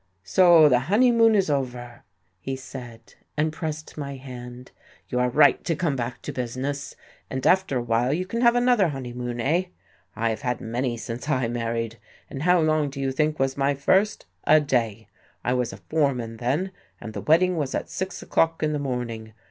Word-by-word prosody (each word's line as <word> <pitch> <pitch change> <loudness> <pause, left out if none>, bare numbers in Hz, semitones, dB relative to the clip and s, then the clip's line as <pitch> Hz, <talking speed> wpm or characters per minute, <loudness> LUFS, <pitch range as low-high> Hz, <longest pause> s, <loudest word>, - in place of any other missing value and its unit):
"So, 170 - +6
the 125 -4 +4
honeymoon 230 0 +5
is 195 -2 +3
over!" 125 -3 -3 0.4
he 135 +9 -4
said, 120 -3 -10 0.2
and 155 +1 +1
pressed 155 0 -5
my 140 -1 -5
hand. 125 -1 -10 0.4
"You 125 - -1
are 125 0 +2
right 145 +3 +4
to 165 - 0
come 150 -3 0
back 125 0 -4
to - - -5
business, 130 +3 -4 0.3
and 130 0 -4
after 185 -6 +3
awhile 120 +1 +1
you 175 +5 -1
can 230 +5 -3
have 235 -1 +5
another 245 -5 +4
honeymoon, 125 -4 -5
eh? 160 +10 +1 0.5
I 115 0 0
have 110 - -5
had 125 -3 -2
many 120 +1 -2
since 115 +5 -6
I 130 -5 +1
married. 115 -1 -3 0.3
And 135 - -5
how 180 +2 +4
long 155 -2 +2
do 140 0 -8
you 135 -1 0
think 150 +3 0
was 135 0 0
my 140 0 +1
first? 190 +9 +1 0.2
A 155 +1 +6
day! 120 -8 -1 0.4
I 125 - +1
was 125 -2 0
a - - -9
foreman 130 -7 -1
then, 145 +11 -1 0.3
and 110 - -8
the - - -5
wedding 180 +4 +3
was 145 -5 -2
at - - -3
six 190 +1 -5
o'clock 165 -1 +1
in 150 0 +1
the 150 - -1
morning. 120 -5 -4
135 Hz, 190 wpm, -25 LUFS, 120-155 Hz, 0.5 s, So